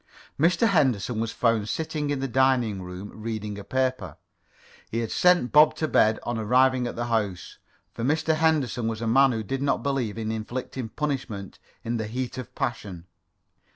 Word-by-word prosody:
Mr. 180 Hz, -, +3 dB
Henderson 125 Hz, -, +1 dB
was 115 Hz, 0 st, -1 dB
found 115 Hz, -3 st, +1 dB
sitting 155 Hz, 0 st, -2 dB
in 145 Hz, -2 st, -1 dB
the 135 Hz, -, -1 dB
dining 125 Hz, -5 st, +2 dB
room, 90 Hz, +3 st, -8 dB
reading 105 Hz, -2 st, -4 dB
a -, -, -8 dB
paper. 130 Hz, -, -2 dB, 0.7 s
He 115 Hz, -, -3 dB
had 115 Hz, -1 st, -2 dB
sent 180 Hz, -8 st, +3 dB
Bob 150 Hz, +1 st, +6 dB
to 155 Hz, -, -1 dB
bed 110 Hz, -6 st, +3 dB
on 120 Hz, -1 st, -2 dB
arriving 125 Hz, +3 st, +3 dB
at -, -, -5 dB
the 120 Hz, -, -2 dB
house, 105 Hz, -6 st, -2 dB, 0.3 s
for 115 Hz, -, -5 dB
Mr. 160 Hz, +4 st, +1 dB
Henderson 150 Hz, -7 st, +1 dB
was 115 Hz, 0 st, -3 dB
a -, -, -1 dB
man 135 Hz, +3 st, +5 dB
who 110 Hz, -2 st, -2 dB
did 135 Hz, +6 st, -3 dB
not 140 Hz, 0 st, 0 dB
believe 130 Hz, -7 st, -1 dB
in 110 Hz, -1 st, -2 dB
inflicting 120 Hz, +2 st, -5 dB
punishment 130 Hz, -9 st, -4 dB, 0.2 s
in 115 Hz, +1 st, -2 dB
the 110 Hz, -1 st, -3 dB
heat 130 Hz, +3 st, -4 dB
of 130 Hz, -, -9 dB
passion. 105 Hz, -10 st, -4 dB
120 Hz, 180 wpm, -25 LUFS, 110-135 Hz, 0.7 s, Bob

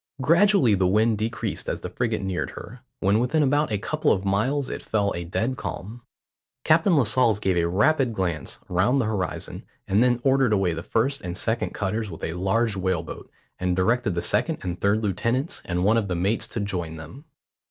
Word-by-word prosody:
Gradually 170 Hz, -, +4 dB
the 95 Hz, -2 st, +2 dB
wind 110 Hz, +3 st, +2 dB
decreased 110 Hz, -1 st, -3 dB
as -, -, -3 dB
the -, -, -5 dB
frigate 110 Hz, -4 st, -1 dB
neared 95 Hz, -2 st, -2 dB
her; 125 Hz, +3 st, -9 dB, 0.2 s
when 100 Hz, +3 st, +3 dB
within 150 Hz, +6 st, +2 dB
about 145 Hz, 0 st, +1 dB
a 105 Hz, -, +1 dB
couple 155 Hz, +10 st, 0 dB
of 95 Hz, 0 st, 0 dB
miles 125 Hz, +8 st, 0 dB
it -, -, -5 dB
fell 100 Hz, -2 st, 0 dB
a 85 Hz, -, -4 dB
dead 115 Hz, +9 st, -2 dB
calm. 115 Hz, +5 st, -6 dB, 0.6 s
Captain 165 Hz, +2 st, +4 dB
Lascelles 125 Hz, -3 st, +3 dB
gave 95 Hz, -3 st, 0 dB
a 85 Hz, -1 st, +2 dB
rapid 125 Hz, -, +2 dB
glance 90 Hz, -6 st, -3 dB
round 100 Hz, +10 st, +2 dB
the 125 Hz, -, +1 dB
horizon, 105 Hz, -4 st, -3 dB, 0.3 s
and 100 Hz, +3 st, +3 dB
then 120 Hz, -1 st, +2 dB
ordered 135 Hz, -4 st, +3 dB
away 95 Hz, -4 st, +1 dB
the 80 Hz, -, -5 dB
first 135 Hz, +9 st, -1 dB
and 90 Hz, -1 st, -5 dB
second 115 Hz, +2 st, -1 dB
cutters 105 Hz, +2 st, -2 dB
with 80 Hz, -, -10 dB
a 80 Hz, -, -2 dB
large 100 Hz, +5 st, 0 dB
whale 95 Hz, -3 st, -1 dB
boat, -, -, -9 dB, 0.3 s
and 90 Hz, 0 st, 0 dB
directed 105 Hz, +1 st, +1 dB
the 85 Hz, -, -2 dB
second -, -, 0 dB
and 90 Hz, -1 st, -4 dB
third 105 Hz, +2 st, +2 dB
lieutenants 115 Hz, -, -1 dB
and 90 Hz, 0 st, -1 dB
one 110 Hz, +4 st, +4 dB
of 110 Hz, -3 st, 0 dB
the 90 Hz, -, -2 dB
mates 95 Hz, +6 st, 0 dB
to -, -, -5 dB
join 90 Hz, -6 st, -3 dB
them. 80 Hz, -, -11 dB
105 Hz, 200 wpm, -24 LUFS, 95-125 Hz, 0.6 s, Gradually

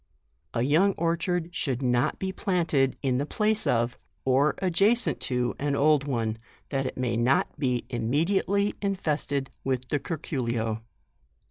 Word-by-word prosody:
A 115 Hz, -, +1 dB
young 165 Hz, +9 st, +4 dB
orchard 170 Hz, 0 st, -1 dB
should 135 Hz, -4 st, -2 dB
not 125 Hz, +4 st, +1 dB
be 190 Hz, 0 st, -2 dB
planted 165 Hz, -9 st, +1 dB
in 130 Hz, -2 st, +1 dB
the 140 Hz, -, 0 dB
place 215 Hz, +3 st, +1 dB
of, 120 Hz, 0 st, +1 dB, 0.3 s
or 135 Hz, +3 st, +3 dB
adjacent 200 Hz, +6 st, +2 dB
to, 125 Hz, -1 st, 0 dB
an 145 Hz, 0 st, 0 dB
old 145 Hz, 0 st, +3 dB
one, 115 Hz, -4 st, -1 dB, 0.3 s
that 135 Hz, -2 st, -1 dB
it -, -, -6 dB
may 125 Hz, -2 st, 0 dB
not 125 Hz, +5 st, +1 dB
be 125 Hz, -4 st, 0 dB
immediately 175 Hz, -, +1 dB
in 200 Hz, -1 st, 0 dB
fested 145 Hz, -5 st, -1 dB
with 130 Hz, -1 st, -2 dB
the 145 Hz, -, +1 dB
curculio. 120 Hz, -9 st, -2 dB
140 Hz, 145 wpm, -27 LUFS, 125-170 Hz, 0.3 s, young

